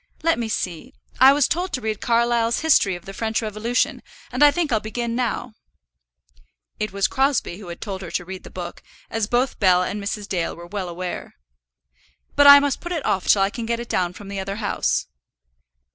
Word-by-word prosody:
Let 330 -5 +2
me 230 -2 -2
see: 200 - -4 0.2
I 265 +1 +9
was 285 -1 +3
told 355 +3 -1
to 255 - 0
read 215 -3 -3
Carlyle's 235 0 +2
History 275 - +3
of 175 - -11
the 195 - -8
French 220 +2 -1
Revolution, 220 +2 -1 0.3
and 250 +4 +2
I 295 - +9
think 320 -1 -1
I'll 220 - +3
begin 230 +2 -4
now." 245 -1 -2 1.3
It 215 -1 -2
was 195 0 +1
Crosbie 265 -9 0
who 200 - -10
had 170 0 -8
told 195 -3 -5
her 175 - -7
to 175 - -3
read 190 +1 -8
the - - -11
book, 175 -1 -7 0.3
as 225 -2 -1
both 245 +3 0
Bell 180 -2 +4
and 200 +2 -4
Mrs. 205 0 -4
Dale 175 -4 -2
were 170 - -10
well 185 0 -5
aware. 180 +1 -6 1.0
"But 285 0 +6
I 285 0 +11
must 285 -1 -1
put 345 - -6
it 320 -5 -3
off 190 - 0
till 195 - +5
I 195 - 0
can 230 0 -5
get 235 0 -1
it 235 - -7
down 180 -1 0
from 200 +2 -11
the 200 0 -5
other 195 +1 -4
house." 210 -1 -1
220 Hz, 210 wpm, -22 LUFS, 190-250 Hz, 1.3 s, I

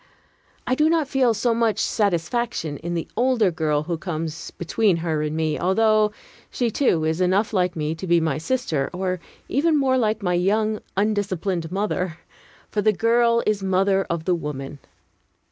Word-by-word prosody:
I 250 - 0
do 305 +4 +3
not 325 -3 +2
feel 260 -4 +2
so 235 +2 +1
much 230 -2 +1
satisfaction 200 -4 -1
in 170 +3 -4
the 165 - -3
older 235 -5 +2
girl 155 -3 0
who 170 0 -3
comes 160 -3 -4
between 190 +2 0
her 155 -2 0
and 150 +1 -2
me, 155 -1 0
although 215 +3 +3 0.4
she, 240 -2 -1
too, 175 - +1
is 160 +3 0
enough 190 +5 +2
like 180 -2 +1
me 155 -1 -1
to 175 +3 -7
be 170 0 +4
my 155 -3 -1
sister, 160 - -1
or 185 0 -2 0.3
even 310 +3 +2
more 260 -2 +2
like 220 -2 0
my 180 -1 +1
young, 215 +4 +1 0.2
undisciplined 195 -5 -1
mother; 185 -4 -2 0.5
for 210 - 0
the 215 - +4
girl 235 +2 +3
is 210 -2 +1
mother 195 +1 +1
of 170 -1 -2
the 185 - +2
woman. 145 -4 -5
190 Hz, 170 wpm, -23 LUFS, 165-225 Hz, 0.5 s, be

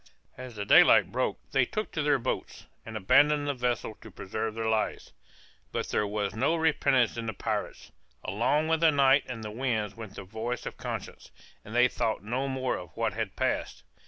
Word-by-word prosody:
As 130 -2 -9
the 100 -1 -4
daylight - - +6
broke - - -1
they 135 - +3
took 215 - -3
to 155 - -2
their 145 -1 +3
boats, 115 - -4 0.2
and 110 -1 -5
abandoned 145 +8 +4
the 145 - +1
vessel 125 -3 -2
to 110 - -11
preserve 110 +3 -4
their 115 0 -2
lives. 110 -1 -1 0.6
But - - -3
there 105 - 0
was 105 -1 -2
no 135 +9 +1
repentance 145 -7 +2
in 115 -1 -4
the 110 - -2
pirates; - - -4 0.3
along 120 +11 +1
with 160 0 +2
the 165 0 +5
night 140 -1 +4
and 115 -3 -6
the 105 - -5
winds 110 -4 -1
went 110 -3 -9
the - - -7
voice 110 +5 -4
of - - -5
conscience, - - -6 0.3
and 110 - -9
they 125 +1 +6
thought 110 -4 -2
no 125 +6 -2
more 130 -1 -1
of 90 - -11
what - - 0
had - - -4
passed. - - -2
120 Hz, 195 wpm, -28 LUFS, 110-135 Hz, 0.6 s, daylight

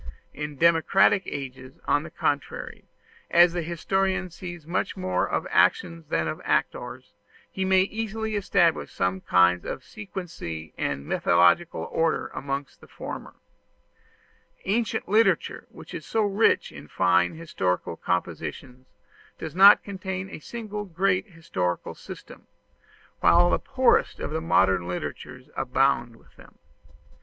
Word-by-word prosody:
In 150 0 -5
democratic 170 +5 +4
ages, 130 -1 -7
on 145 - +2
the 170 - -9
contrary, 145 -3 -3 0.4
as 175 0 +6
the 175 - -1
historian 190 +3 -1
sees 175 -2 -8
much 175 +4 -2
more 185 0 -1
of - - -1
actions 165 - +2
than 80 - 0
of 80 - -4
actors, - - -2 0.4
he 190 - -2
may 190 0 +4
easily 220 +1 -3
establish 175 -5 +2
some 95 +1 -1
kind 90 -1 +3
of - - -5
sequency 170 - -7
and 70 0 -3
methodical 90 - +2
order 165 -1 0
amongst 140 +1 -5
the - - -15
former. - - -8 1.3
Ancient 220 +4 -1
literature, 215 +4 +2
which - - -13
is - - -6
so 225 - 0
rich 205 +2 +2
in - - -11
fine 90 - +2
historical 90 - -2
compositions, 90 - -4 0.5
does 160 - -6
not 200 +2 +8
contain 190 -1 -5
a - - -7
single 210 +2 -6
great 185 +1 0
historical 95 - -3
system, - - -12 0.7
whilst 175 +1 +5
the - - +2
poorest 260 -2 +3
of - - -4
modern 95 - +2
literatures 125 +7 -6
abound 130 -2 +1
with - - -23
them. - - -17
165 Hz, 130 wpm, -26 LUFS, 120-190 Hz, 1.3 s, not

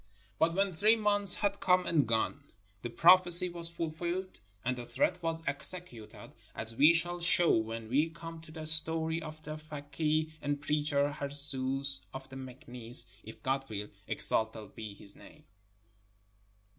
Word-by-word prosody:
But 165 +1 +1
when 195 -1 -1
three 210 +7 +3
months 205 -3 +5
had 200 -1 -2
come 180 0 +2
and 150 -7 0
gone, 115 +5 -2 0.4
the 120 - -6
prophecy 175 +6 +7
was 170 -1 +5
fuL&lled 170 +3 -5 0.3
and 125 +1 -1
the 125 - -8
threat 130 +9 -2
was 165 -1 -4
executed, 140 - -6 0.2
as 110 +1 -6
we 150 +7 +5
shall 175 +1 -1
show 170 0 +3
when 110 0 -4
we 145 +7 0
come 165 0 -11
to 160 - -15
the 160 -1 -9
story 160 +1 0
of 155 0 -11
the 155 0 -7
fakeeh 155 +1 -4
and 145 0 -3
preacher 145 -1 -1
Harzooz 140 -1 +1 0.2
of 135 0 -9
Meknes, 125 -2 -3 0.2
if 110 - -14
God 135 +1 -2
wiU 105 -1 -7
— - - -35
exalted 110 -2 0
be 110 -2 -9
His 100 0 -6
name - - -17
155 Hz, 155 wpm, -30 LUFS, 130-170 Hz, 0.4 s, prophecy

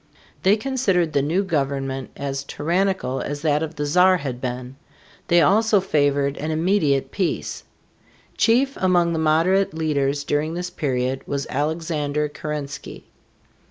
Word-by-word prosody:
They 195 +3 +4
considered 210 -10 0
the 140 - +3
new 165 +8 +1
government 135 -6 -2
as 140 -1 -3
tyrannical 170 -2 -1
as 145 +1 -5
that 150 -1 +2
of 160 0 -4
the 145 0 -2
Czar 180 +5 +4
had 130 -6 -5
been. 125 0 -5 0.5
They 175 0 +5
also 210 +5 +4
favored 145 -6 +1
an 155 - -3
immediate 160 -4 +1
peace. 185 -3 -2 0.7
Chief 260 +4 +3
among 175 -2 +2
the 160 - -1
moderate 165 +4 +2
leaders 145 -3 0
during 150 +3 -1
this 180 +1 -4
period 130 -5 -1
was 140 -1 -2
Alexander 150 0 -1
Keren´sky. 145 -1 -6
155 Hz, 135 wpm, -22 LUFS, 140-180 Hz, 0.7 s, They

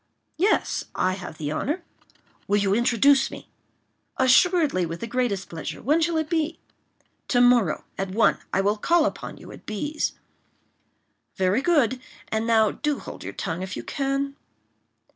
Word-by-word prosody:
"Yes; 400 +5 +1
I 185 - +1
have 180 -4 -8
the 150 -1 -3
honor." 300 - -2 0.6
"Will 205 - +3
you 200 -1 +2
introduce 265 +4 +4
me?" - - -11 0.7
"Assuredly, 280 - +4
with 165 0 -4
the - - -4
greatest 230 -5 -1
pleasure; 160 -2 -6
when 305 +5 +2
shall 330 0 +1
it 315 -1 0
be?" 325 0 -1 0.7
"To 245 - +2
morrow, 245 -9 +4 0.2
at 195 0 -2
one, 215 +5 +3
I 195 - +2
will 205 +2 +1
call 335 +8 +3
upon - - -4
you - - -12
at - - -14
B—'s." 295 +9 -2 1.2
"Very 190 +5 +2
good; 275 -7 +2 0.3
and 220 +1 -1
now 220 -2 +4
do 295 -2 -2
hold - - -9
your - - -6
tongue, 165 +2 -4
if 190 0 -5
you - - -5
can." 275 0 -2
245 Hz, 160 wpm, -25 LUFS, 195-295 Hz, 1.2 s, introduce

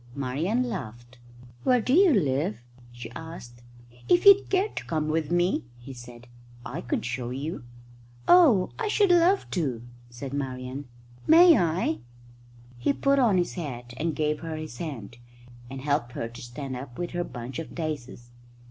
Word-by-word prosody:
Marian 150 - -1
laughed. 120 - -7 0.4
"Where 250 -1 +4
do 250 +3 0
you 370 +2 +6
live?" 135 - 0 0.3
she 120 -1 -9
asked. 120 -5 -10 0.5
"If 355 +2 +4
you'd 400 0 +7
care 390 +2 +2
to - - -7
come 155 -2 -1
with 155 -1 -1
me," 175 -4 +1
he 125 +3 -10
said, 120 -1 -12 0.4
"I - - -5
could 120 - -2
show 120 0 -3
you." 135 +2 -5 0.6
"Oh, 290 - +6
I 450 - -1
should 415 -2 +3
love 355 +3 +4
to!" 130 -10 -2 0.3
said 130 +3 -8
Marian. 130 0 -4 0.4
"May 335 +1 +8
I?" 165 - 0 0.8
He 120 - +1
put 275 0 +2
on 225 -7 +4
his 175 - 0
hat 125 -8 -6
and 160 -1 -2
gave 150 0 0
her 165 -1 -5
his 155 -5 -7
hand, 120 -8 -7 0.5
and 135 0 -7
helped 140 -4 -1
her 115 - -3
to 120 +1 -11
stand 130 +2 -6
up 125 -1 -8
with 175 -1 -4
her 175 0 -2
bunch 125 -3 -7
of 165 - -8
daisies. 140 -7 -5
150 Hz, 165 wpm, -26 LUFS, 120-185 Hz, 0.8 s, May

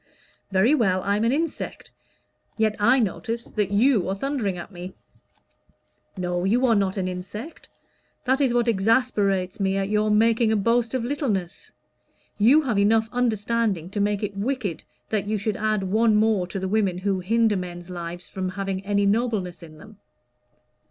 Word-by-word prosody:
"Very 195 +8 +4
well, 190 -10 +2
I 200 +1 +1
am 215 - 0
an 230 - +3
insect; 320 +3 -3 0.7
yet 220 -1 +1
I 240 +6 +4
notice 230 +1 -2
that 210 -3 -2
you 210 -2 +3
are 190 - -1
thundering 220 -5 -2
at 175 - -8
me." 180 0 -9 1.2
"No, 180 -1 -2
you 235 +7 +2
are 235 - +4
not 195 -2 0
an 185 -1 -1
insect. 190 - -7 0.6
That 265 +2 +2
is 265 -3 +3
what 240 0 +1
exasperates 205 -3 +1
me 195 0 +1
at 195 0 -1
your 210 0 +1
making 225 +1 +3
a - - +3
boast 230 +3 +1
of 255 - -1
littleness. 225 - -3 0.7
You 265 +9 +5
have 235 -7 0
enough 220 +2 +3
understanding 225 -6 0
to 205 - -3
make 205 0 0
it 205 -1 -3
wicked 210 - -3 0.3
that 205 -2 -1
you 215 +1 0
should 210 +1 -2
add 215 -1 0
one 215 +3 +2
more 210 -4 +2
to 190 - -5
the 190 0 -2
women 195 -3 +1
who 190 0 -1
hinder 220 +3 +2
men's 175 -1 -6
lives 175 0 -6
from 185 -1 -4
having 195 0 -4
any 200 0 +1
nobleness 200 -5 0
in 155 -2 -12
them." 210 +6 -15
205 Hz, 170 wpm, -24 LUFS, 190-230 Hz, 1.2 s, You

